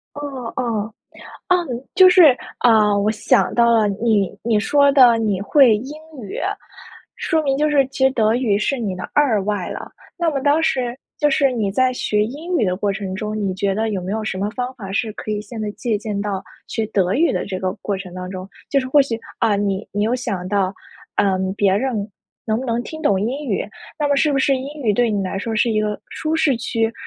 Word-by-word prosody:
哦 270 -5 -6
哦。 220 -3 -2 0.6
啊， 365 - +5 0.4
就 375 -1 +8
是， 340 -8 +7 0.2
啊， 215 -3 +4
我 200 +1 +2
想 220 - +1
到 235 -1 +4
了， 220 -2 +4
你 205 -1 +1
你 225 -2 +2
说 280 +6 +4
的 250 -4 +7
你 210 -4 0
会 240 +1 +5
英 260 +7 -7 0.3
语， 200 - -6 0.8
说 320 -3 0
明 275 -2 0
就 300 +2 +1
是 280 -2 +3
其 265 0 -1
实 265 - +5
德 220 -3 +2
语 235 -5 +1
是 270 +6 -1
你 210 -5 -2
的 - - -6
2 255 -9 +3
外 205 -3 -2
了。 - - -7 0.3
那 340 -1 +1
么 280 -3 -2
当 290 +3 +2
时 250 -5 0 0.2
就 295 -1 +2
是 275 -1 +2
你 215 -5 -1
在 255 +5 +2
学 210 -4 0
英 310 +10 -4
语 225 - +2
的 180 -2 0
过 200 +1 0
程 195 -1 -5
中， 215 +2 -4
你 195 -3 -1
觉 195 0 -1
得 220 +2 -1
有 200 -3 -2
没 185 - -5
有 220 0 -2
什 200 - -3
么 200 +2 -1
方 250 +3 -4
法， 200 -7 -8
是 220 +2 -1
可 215 - -7
以 210 -1 -1
现 215 +2 -8
在 210 - -2
借 225 0 -2
鉴 210 -2 -4
到 200 -2 -3 0.2
学 225 - -2
德 190 -4 0
语 330 +6 +3
的 - - -2
这 190 -2 -4
个 185 0 -2
过 200 - -2
程 190 -2 -8
当 180 0 -6
中？ 185 0 -7 0.2
就 275 - +3
是 255 - -5
或 290 +3 +5
许， 245 -5 0 0.2
啊， 225 -2 +2
你 200 0 -1
你 205 - -1
有 230 +3 +1
想 195 -8 -3
到， 195 -1 0 0.4
嗯， 190 -1 +1
别 200 -2 +2
人， 220 -3 -2 0.4
能 220 -1 +1
不 260 - -5
能 235 0 -1
听 315 +5 -8
懂 200 - +2
英 265 +8 -3
语？ 200 - 0 0.3
那 295 -2 0
么 285 - +2
是 295 +1 +2
不 275 - +1
是 270 0 +3
英 280 +3 -7
语 220 -4 +2
对 235 +2 +2
你 205 -2 0
来 190 +1 -3
说 225 +3 -3
是 225 +2 +2
一 215 -1 +1
个 210 -1 -2
舒 310 0 -3
适 300 -5 +2
区？ 225 0 -1
225 Hz, 245 characters per minute, -20 LUFS, 205-265 Hz, 0.8 s, 就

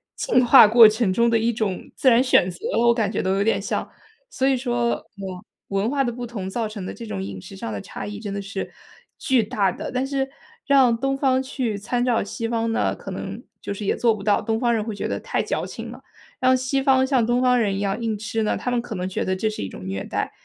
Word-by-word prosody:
进 255 - +2
化 230 -2 +9
过 225 +1 +9
程 215 -3 0
中 235 +4 +3
的 230 -1 +3
一 230 +2 +1
种 210 -5 -3
自 260 - +4
然 240 +2 +5
选 185 -8 +4
择， 175 - -8 0.3
我 235 - +6
感 220 -4 0
觉 - - -1
都 190 +1 0
有 200 - +1
点 225 - +1
像。 - - -3 0.4
所 270 - 0
以 270 - +3
说 240 -2 -1 0.2
我 190 0 -7 0.2
文 195 +3 0
化 275 0 +1
的 240 - -1
不 245 +1 -6
同 205 -5 -5
造 225 +2 -2
成 210 -3 -7
的 - - -5
这 235 - -9
种 95 - -4
饮 95 -1 -6
食 - - -11
上 110 - -5
的 100 - -4
差 - - -7
异， 205 0 -6
真 205 -2 -5
的 200 - -3
是 195 0 -5 0.5
巨 260 -5 +2
大 200 -2 0
的。 - - -6
但 255 +1 -1
是 270 -1 -1 0.4
让 260 -5 +4
东 270 +2 -1
方 260 -2 +2
去 250 -5 -3
参 240 +4 -1
照 245 -4 +1
西 225 +3 -4
方， 230 -1 -1
那 - - 0
可 - - -9
能 - - -6 0.2
就 200 - -4
是 200 0 -6
也 - - +1
做 230 -2 +2
不 200 - -9
到， 205 0 +2
东 225 0 -1
方 240 -2 +2
人 215 -2 0
会 220 -2 -5
觉 - - -3
得 - - -3
太 - - -2
矫 - - -2
情 - - -7
了。 - - -11 0.4
让 255 0 +4
西 260 +2 -1
方 265 -1 +4
像 260 -4 +2
东 240 +1 +2
方 250 -1 +4
人 200 -3 +1
一 - - -3
样 200 +2 -1
硬 225 -2 -1
吃 220 +2 -3
呢， 215 - 0
他 250 - -3
们 240 - +1
可 230 -2 -7
能 180 0 -3
觉 190 - -2
得 185 - -1
这 215 +3 0
是 215 - -6
一 95 - -4
种 90 - -10
虐 95 +1 -3
待。 - - -3
225 Hz, 290 characters per minute, -23 LUFS, 200-250 Hz, 0.5 s, 化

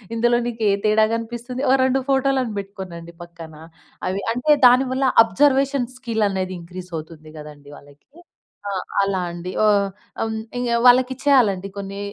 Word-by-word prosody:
ఇందులో 240 +1 +2
నీకు 230 -2 -5
ఏ - - +3
తేడా 215 0 +4
గనిపిస్తుంది? 240 +3 -5
ఓ - - +4
2 260 +1 +2
ఫోటోలను 265 -4 +1
పెట్టుకోనండి 180 -4 -9
పక్కన. 165 -2 -12 0.5
అవి 190 +2 -2
అంటే, 250 +5 0 0.2
దాని 255 +2 +4
వల్ల 265 0 +1 0.2
అబ్జర్వేషన్ 275 0 +1
స్కిల్లనేది 205 -6 -2
ఇంక్రీజవుతుంది 165 -3 -9
గదండీ 145 -1 -12
వాళ్ళకి. 145 - -20 0.6
ఆ! - - -3 0.3
అలా 195 -1 -1
అండి. 175 +1 -7
ఓ - - +4 0.6
హ్మ్. 220 0 -2 0.2
ఇంగ 245 -1 -2 0.2
వాళ్ళకిచ్చేయాలండి 250 -6 +3
కొన్ని. 200 0 -6
215 Hz, 135 wpm, -21 LUFS, 180-250 Hz, 0.6 s, తేడా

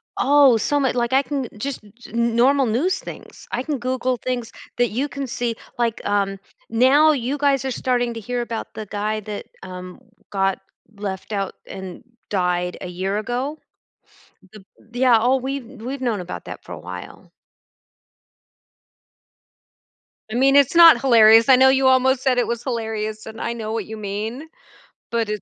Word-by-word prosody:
Oh, 280 -4 +5
so 290 +6 0
mu 265 -2 +1
like, 240 0 -1
I 265 - +5
can, 280 -2 -3
eh, - - -9
just 265 +2 -5 0.2
n 235 0 -1
normal 270 +3 +4
news 260 +12 0
things, - - -11
I 245 - -1
can 295 0 -2
Google 255 0 -1
things 245 -1 -4 0.3
that 245 -1 +2
you 260 +7 -2
can 280 -1 -5
see 240 -2 -2 0.2
like, 235 -2 -1
um, 200 -1 0 0.3
now 265 +7 +5
you 270 0 -2
guys 280 -2 +2
are 265 - -1
starting 245 -1 -1
to 230 - -6
hear 245 +3 -3
about 230 -1 -5
the 215 - -6
guy 210 +1 -2
that, 210 0 -7 0.2
um, 185 +1 -9 0.3
got 195 -1 0 0.4
left 200 0 -6
out 195 -1 -2
and 190 -2 -8 0.3
died 180 -2 -1
a - - -5
year 190 +3 -3
ago. 250 +7 -3 0.9
Th 210 -2 -13 0.3
Yeah, 245 -1 +4
oh, 255 +3 +3
we've 265 0 -4 0.2
we've 265 +3 -5
known 230 -6 -1
about 180 - -7
that - - -9
for - - -13
a - - -8
while. - - -10 3.0
I - - -3
mean, 270 +2 +4
it's 280 +2 +4
not 335 -6 +9
hilarious, 225 -3 +6
I 260 - +9
know 260 +1 +6
you 265 0 +3
almost 260 0 +3
said 260 -2 +2
it 245 - +1
was 235 -1 -3
hilarious, 220 -3 -3
and 220 0 -9
I 235 - -2
know 220 -2 -5
what 220 -3 -3
you 220 - -7
mean. 215 +8 -5 0.6
But 230 -2 0
it 210 -2 -3
235 Hz, 175 wpm, -21 LUFS, 215-265 Hz, 3.0 s, not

